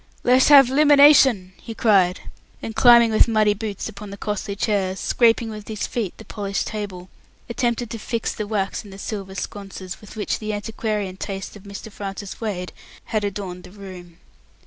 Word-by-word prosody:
"Let's 255 +1 +5
have 280 -3 +8
'luminashon!" 280 -8 +6
he 225 - -8
cried; 195 -6 +3 0.4
and 220 - -7
climbing 235 0 +6
with 215 - +5
muddy 215 -2 +3
boots 205 -1 -5
upon 210 -1 -9
the 200 - -8
costly 205 0 -4
chairs, 195 -2 -1
scraping 230 -1 +2
with 210 -1 -9
his 215 -2 -3
feet 220 -7 -4
the 220 - -12
polished 200 -2 -3
table, 190 -4 -6 0.4
attempted 235 -1 -2
to 230 - -5
fix 230 +1 -3
the 210 - -5
wax 205 -1 -2
in 205 - -13
the 195 - -11
silver 195 -2 -6
sconces, 195 -2 -7
with 210 - -13
which 210 - -2
the 215 -1 -4
antiquarian 210 -2 -3
tastes 195 0 -6
of 205 0 -14
Mr. 200 +2 -9
Francis 200 +1 -7
Wade 185 -5 -4 0.4
had 215 -1 +1
adorned 190 -3 -5
the - - -12
room. 180 -3 -11
210 Hz, 175 wpm, -22 LUFS, 195-225 Hz, 0.4 s, have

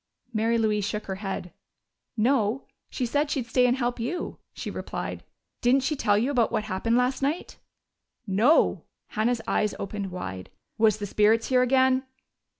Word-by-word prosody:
Mary 225 +1 +2
Louise 215 -2 +1
shook 210 +2 -3
her 190 -1 -4
head. 190 -3 -4 0.6
"No. 235 +1 +2 0.3
She 255 - -2
said 290 +5 0
she'd 270 -5 -1
stay 250 +2 +3
and 250 +1 +2
help 245 -1 -1
you," 330 +10 -3
she - - -6
replied. - - -5 0.4
"Didn't 255 +2 +3
she 300 +3 0
tell 205 -6 +2
you 245 +7 +1
about 240 -5 +2
what 215 - 0
happened 215 +3 0
last 250 +2 +1
night?" 290 +6 -2 0.7
"No!" 220 +10 +3 0.2
Hannah's 230 +2 0
eyes 210 -1 +1
opened 200 0 -4
wide. 95 - -6 0.3
"Was 215 -2 +4
the 205 - -4
spirits 215 +3 +2
here 255 -1 +4
again?" 260 +1 +3
230 Hz, 160 wpm, -26 LUFS, 210-260 Hz, 0.7 s, Was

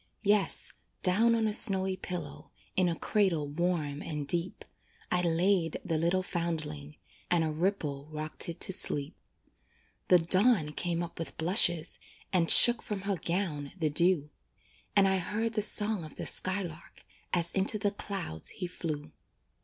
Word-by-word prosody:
Yes, 205 -1 +1 0.3
down 225 +5 +3
on 225 -1 -1
a 215 - -1
snowy 190 -3 +6
pillow, 180 -1 -8 0.3
In 185 -2 +1
a 165 - -4
cradle 185 -9 -1
warm 155 -2 -3
and 150 -3 -6
deep, 175 +3 -3 0.5
I 180 - +1
laid 170 0 0
the 165 -4 -2
little 175 +3 -1
foundling, 160 - -6 0.3
And 175 -2 +1
a 160 - -2
ripple 150 -4 -4
rocked 155 +2 -1
it 170 +1 -5
to 190 - +6
sleep. 145 -5 +2 0.9
The 180 - +5
dawn 185 0 +2
came 170 +2 -3
up 170 - -10
with 165 - -7
blushes, 175 -1 +3 0.3
And 170 -3 +1
shook 240 -1 +9
from 205 -2 -6
her 195 -1 -3
gown 170 -6 -4
the 155 -4 -2
dew; 165 -2 +1 0.6
And 195 -1 +4
I 190 0 0
heard 220 +5 -3
the 215 - -1
song 210 -2 +3
of 155 - -12
the - - -7
skylark, 185 -4 -2 0.3
As 170 -2 -1
into 195 +2 +1
the 205 0 -2
clouds 195 - -5
he 185 - -6
flew. 155 -4 -7
175 Hz, 155 wpm, -28 LUFS, 160-195 Hz, 0.9 s, shook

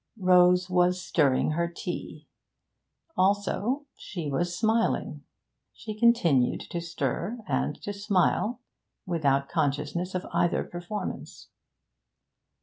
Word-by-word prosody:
Rose 180 -1 +5
was 180 0 +2
stirring 150 -6 +2
her 170 +2 0
tea; 170 - -6 0.9
also 205 +8 +1
she 165 -6 -6
was 175 +5 -1
smiling. 225 +1 0 0.5
She 215 - -7
continued 210 - +3
to 170 - -2
stir 170 - -3
and - - -1
to 205 - -4
smile, 205 +4 +1 0.4
without 140 -6 +1
consciousness 155 +4 -1
of 185 - -2
either 175 - +2
performance. 175 +4 -6
180 Hz, 100 wpm, -27 LUFS, 165-205 Hz, 0.9 s, Rose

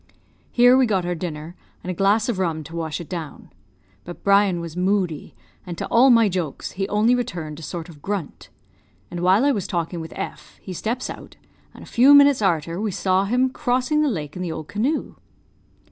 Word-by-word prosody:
Here 245 +1 +6
we 260 -1 +4
got 190 -5 0
our 175 - -1
dinner, 165 -1 -6 0.3
and 185 - -3
a - - -3
glass 200 +4 +2
of 230 -6 -2
rum 165 -4 -1
to 165 +3 -10
wash 160 -1 -3
it 170 - -8
down. 165 -6 -7 0.5
But 175 - -10
Brian 200 -3 +3
was 170 -1 -7
moody, 180 -4 -1 0.3
and 175 -2 -7
to - - -3
all 250 +3 +5
my 230 -3 +6
jokes 175 -7 -3
he 195 +1 -3
only 215 +4 +3
returned 165 -11 -3
a - - -10
sort 165 +2 -6
of 155 -4 -14
grunt; 195 -5 -5 0.6
and 175 - -5
while 190 +8 +3
I 285 - +4
was 200 -7 -2
talking 170 -2 -3
with 160 0 -8
F, - - -7
he 185 - -8
steps 230 +8 -3
out, - - -10 0.4
and - - -12
a - - -11
few 270 +4 +6
minutes 285 -3 +6
arter 170 -1 0
we 220 - -1
saw 190 0 +1
him 250 +5 +1
crossing 255 +5 0
the 300 - +2
lake 150 - -5
in 180 - -5
the 175 -2 -3
old 155 -1 -6
canoe. 255 +10 -2
185 Hz, 205 wpm, -22 LUFS, 170-230 Hz, 0.6 s, Here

